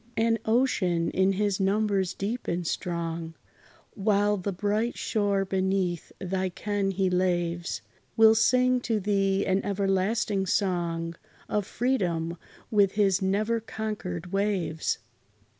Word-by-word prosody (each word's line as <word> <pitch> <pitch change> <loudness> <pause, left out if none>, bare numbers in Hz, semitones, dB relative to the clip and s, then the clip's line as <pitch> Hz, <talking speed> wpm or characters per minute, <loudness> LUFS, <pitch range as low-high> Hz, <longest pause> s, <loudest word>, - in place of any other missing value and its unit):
And 225 0 +2
ocean, 210 -8 +1
in 190 +1 +2
his 205 0 0
numbers 195 -1 +1
deep 225 +5 -3
and 175 0 -1
strong, 165 -1 -3 0.6
While 205 0 +2
the 200 +2 -3
bright 210 +5 -1
shore 200 -2 0
beneath 190 -2 -1
thy 190 0 -1
ken 205 +2 -2
he 190 0 0
laves, 175 -2 0 0.3
Will 220 0 +8
sing 250 +3 +3
to 225 -3 0
thee 195 -1 +1
an 190 +1 +1
everlasting 195 0 0
song 170 -4 -1 0.3
Of 205 -2 -1
freedom, 175 -10 -1 0.3
with 200 -3 +4
his 200 -2 +2
never 210 +4 +1
conquered 210 -6 -5
waves. 195 -5 0
195 Hz, 120 wpm, -27 LUFS, 180-210 Hz, 0.6 s, Will